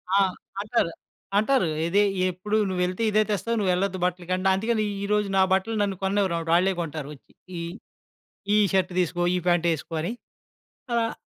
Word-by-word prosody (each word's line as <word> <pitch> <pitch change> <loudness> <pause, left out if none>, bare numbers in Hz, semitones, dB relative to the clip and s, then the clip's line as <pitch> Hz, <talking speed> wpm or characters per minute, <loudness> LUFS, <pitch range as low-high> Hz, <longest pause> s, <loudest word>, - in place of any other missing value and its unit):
ఆ! - - +5 0.4
అంటారు. 210 -5 0 0.5
అంటారు. 230 -3 +3 0.2
ఇదే 200 +4 +3 0.3
ఎప్పుడు 210 +5 -2
నువ్వెళ్తే 180 +3 -1
ఇదే 215 +1 +4
తెస్తావు. 230 +3 -1
నువ్వెళ్ళొద్దు 185 0 0
బట్టలకి 180 0 -2 0.2
అందుకని 220 +1 0 0.2
ఈరోజు 210 0 +1
నా 190 - +6
బట్టలు 205 +4 0
నన్ను 200 -1 0
కొననివ్వరమాట 190 -4 0
వాళ్ళే 190 +2 +3
కొంటారు 150 -3 -5
వచ్చి. - - -24 0.3
ఈ - - -4 0.9
ఈ - - +5 0.2
షర్ట్ 185 -1 +2
తీసుకో, 175 0 0
ఈ - - +2
ప్యాంట్ 175 -1 +3
యేసుకో 160 +1 -4
అని. 175 - -2 0.8
ఆహ్, 230 -1 0
190 Hz, 150 wpm, -25 LUFS, 175-210 Hz, 0.9 s, నా